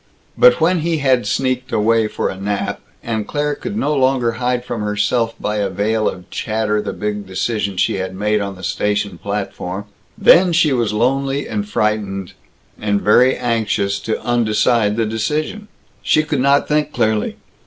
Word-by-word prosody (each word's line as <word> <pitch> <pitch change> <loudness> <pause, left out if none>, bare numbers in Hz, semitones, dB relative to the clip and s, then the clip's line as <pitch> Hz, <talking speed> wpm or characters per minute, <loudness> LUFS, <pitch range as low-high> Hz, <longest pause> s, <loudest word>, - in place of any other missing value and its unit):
But - - +6
when 175 +2 +3
he 165 +1 0
had 130 -6 +2
sneaked 130 +3 -1
away 110 +1 +2
for - - -2
a - - -5
nap, 100 +1 -3 0.2
and 110 -2 -3
Claire 145 0 -1
could 200 +7 -5
no 150 -8 0
longer 130 -3 +2
hide 125 +1 -2
from 120 -3 -4
herself 105 +3 0
by 105 0 -2
a 100 -2 0
veil 105 +3 0
of 90 -1 -9
chatter 110 -1 -1
the - - -4
big 105 -1 -4
decision 100 0 -2
she 95 - +1
had 95 0 -4
made 105 +2 0
on 100 -1 -4
the 95 - -13
station 105 -1 -1
platform, 100 -1 -4 0.3
then 180 0 +6
she 160 -4 +3
was 120 -4 0
lonely 135 +5 0
and 210 -1 -3
frightened 100 - -1 0.5
and 105 -1 0
very 125 +6 +4
anxious 110 -4 0
to 110 - -2
undecide 115 -2 +2
the 115 0 +1
decision. 150 - -2 0.3
She 155 - +3
could 150 -3 -1
not 140 +1 +3
think 150 0 +1
clearly. 110 -5 0
110 Hz, 170 wpm, -18 LUFS, 105-135 Hz, 0.5 s, But